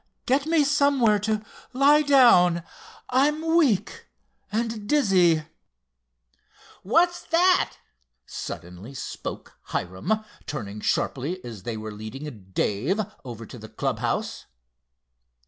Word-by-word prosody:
"Get 275 Hz, +4 st, +1 dB
me 320 Hz, -2 st, +4 dB
somewhere 280 Hz, -7 st, +3 dB
to 215 Hz, +1 st, -1 dB, 0.3 s
lie 285 Hz, +3 st, +5 dB
down. 235 Hz, -, +5 dB, 0.5 s
I'm 300 Hz, +5 st, +2 dB
weak 235 Hz, -, +1 dB, 0.4 s
and 225 Hz, -1 st, -3 dB
dizzy." 185 Hz, -, +4 dB, 1.4 s
"What's 345 Hz, -, +2 dB
that!" 360 Hz, +2 st, +3 dB, 0.5 s
suddenly 90 Hz, +10 st, -8 dB
spoke -, -, -7 dB
Hiram, 95 Hz, -, -2 dB, 0.2 s
turning 105 Hz, -8 st, -5 dB
sharply 145 Hz, -, -1 dB
as 115 Hz, -5 st, -8 dB
they 110 Hz, +3 st, -4 dB
were 110 Hz, 0 st, -6 dB
leading 110 Hz, +1 st, -8 dB
Dave 120 Hz, -, 0 dB, 0.2 s
over 115 Hz, -3 st, -8 dB
to -, -, -11 dB
the -, -, -10 dB
club -, -, -2 dB
house. -, -, -3 dB
205 Hz, 105 wpm, -25 LUFS, -, 1.4 s, lie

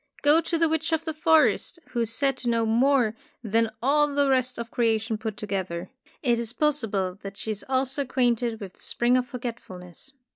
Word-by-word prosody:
Go 300 Hz, +3 st, +6 dB
to 335 Hz, +1 st, -1 dB
the 330 Hz, 0 st, +3 dB
witch 320 Hz, +1 st, -1 dB
of 320 Hz, 0 st, 0 dB
the 320 Hz, -, -2 dB
forest, 315 Hz, +3 st, +3 dB
who 240 Hz, -, -3 dB
is 230 Hz, -1 st, 0 dB
said 270 Hz, +3 st, +2 dB
to 245 Hz, -, -3 dB
know 230 Hz, -1 st, +2 dB
more 240 Hz, 0 st, +3 dB, 0.3 s
than 225 Hz, +1 st, +1 dB
all 295 Hz, +3 st, +4 dB
the 285 Hz, -1 st, +1 dB
rest 255 Hz, -1 st, +1 dB
of 235 Hz, -1 st, -6 dB
creation 225 Hz, -1 st, +1 dB
put 215 Hz, -1 st, -5 dB
together. 190 Hz, -2 st, -4 dB, 0.3 s
It 240 Hz, -3 st, +2 dB
is 235 Hz, 0 st, -3 dB
possi 295 Hz, -7 st, 0 dB
ble 190 Hz, -1 st, -2 dB
that 195 Hz, 0 st, -8 dB
she 220 Hz, -, -4 dB
is 205 Hz, -, -5 dB
also 265 Hz, +1 st, 0 dB
acquainted 245 Hz, -3 st, 0 dB
with 195 Hz, -4 st, -8 dB
the -, -, -27 dB
Spring 240 Hz, +1 st, +2 dB
of 250 Hz, -1 st, +1 dB
Forgetfulness. 230 Hz, -, -8 dB
240 Hz, 205 wpm, -26 LUFS, 220-275 Hz, 0.3 s, Go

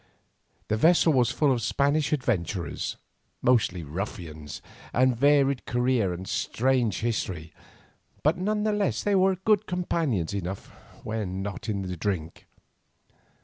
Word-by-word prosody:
The 110 Hz, -, 0 dB
vessel 165 Hz, +4 st, +5 dB
was 125 Hz, -3 st, +3 dB
full 145 Hz, +1 st, +2 dB
of 125 Hz, -3 st, +1 dB
Spanish 145 Hz, +5 st, +1 dB
adventurers, 105 Hz, -, -1 dB, 0.5 s
mostly 105 Hz, -8 st, +2 dB
ruffians 80 Hz, -2 st, -6 dB, 0.4 s
of 130 Hz, +1 st, +5 dB
varied 140 Hz, +1 st, +3 dB
career 120 Hz, -5 st, +1 dB
and 90 Hz, +2 st, -6 dB
strange 125 Hz, -4 st, 0 dB
history, 95 Hz, -9 st, -2 dB, 0.7 s
but 155 Hz, +3 st, +4 dB
none 210 Hz, +3 st, -1 dB
the 215 Hz, -, +2 dB
less 205 Hz, -1 st, 0 dB, 0.4 s
good 215 Hz, -1 st, +3 dB
companions 160 Hz, -, -1 dB
enough 95 Hz, -1 st, -4 dB, 0.3 s
when 100 Hz, -4 st, -3 dB
not 100 Hz, +2 st, -5 dB
in 100 Hz, -2 st, -1 dB
drink. 90 Hz, -2 st, -4 dB
115 Hz, 115 wpm, -27 LUFS, 95-140 Hz, 0.7 s, vessel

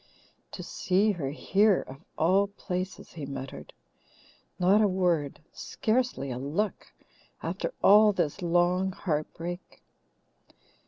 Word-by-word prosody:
"To -, -, -6 dB
see 200 Hz, +3 st, +1 dB
her 160 Hz, -9 st, -3 dB
here, 195 Hz, +7 st, +2 dB
of 135 Hz, +4 st, -11 dB
all 190 Hz, +5 st, +3 dB
places!" 185 Hz, -2 st, -5 dB
he 150 Hz, -4 st, -7 dB
muttered. 135 Hz, -1 st, -7 dB, 0.9 s
"Not 190 Hz, +4 st, +4 dB
a 210 Hz, -, +5 dB
word, 175 Hz, -7 st, 0 dB
scarcely 225 Hz, -, -1 dB
a 125 Hz, -, -4 dB
look, 165 Hz, +11 st, -2 dB, 0.6 s
after -, -, -3 dB
all 210 Hz, +1 st, +7 dB
this 175 Hz, -2 st, -2 dB
long 180 Hz, +2 st, +2 dB
heartbreak! 170 Hz, +1 st, -4 dB
180 Hz, 110 wpm, -28 LUFS, 155-200 Hz, 0.9 s, all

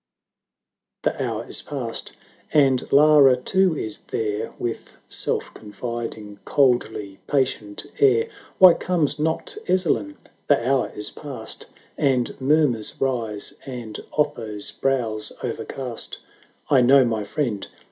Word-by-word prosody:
ni. -, -, +4 dB
The -, -, -4 dB
hour -, -, -3 dB
is -, -, -1 dB
past, 125 Hz, -6 st, -3 dB, 0.4 s
and 135 Hz, -4 st, +3 dB
Lara 145 Hz, -2 st, +7 dB
too 185 Hz, +5 st, +2 dB
is 110 Hz, -5 st, -3 dB
there. 105 Hz, -1 st, -2 dB
With 120 Hz, -1 st, -5 dB
self -, -, -1 dB
confiding, 110 Hz, -1 st, -6 dB
coldly 110 Hz, -7 st, +1 dB
patient 115 Hz, -7 st, -1 dB
air; 125 Hz, -5 st, +4 dB, 0.3 s
Why 185 Hz, -2 st, +9 dB
comes 165 Hz, -6 st, 0 dB
not 160 Hz, -, -1 dB
Ezzelin? 185 Hz, -, +1 dB, 0.3 s
The 125 Hz, -5 st, +3 dB
hour 135 Hz, -1 st, +1 dB
is 105 Hz, -, 0 dB
past, 135 Hz, -7 st, -7 dB, 0.3 s
And 130 Hz, -3 st, +1 dB
murmurs 135 Hz, -6 st, +2 dB
rise, 115 Hz, -6 st, -1 dB
and 120 Hz, -5 st, -6 dB, 0.2 s
Otho's 110 Hz, -8 st, -1 dB
brow's 115 Hz, -6 st, -1 dB
o'ercast. 125 Hz, -4 st, -4 dB, 0.5 s
"I 135 Hz, -3 st, +5 dB
know 130 Hz, +2 st, +6 dB
my 110 Hz, -3 st, -1 dB
friend! 105 Hz, -2 st, -2 dB
125 Hz, 115 wpm, -23 LUFS, 110-145 Hz, 0.5 s, Why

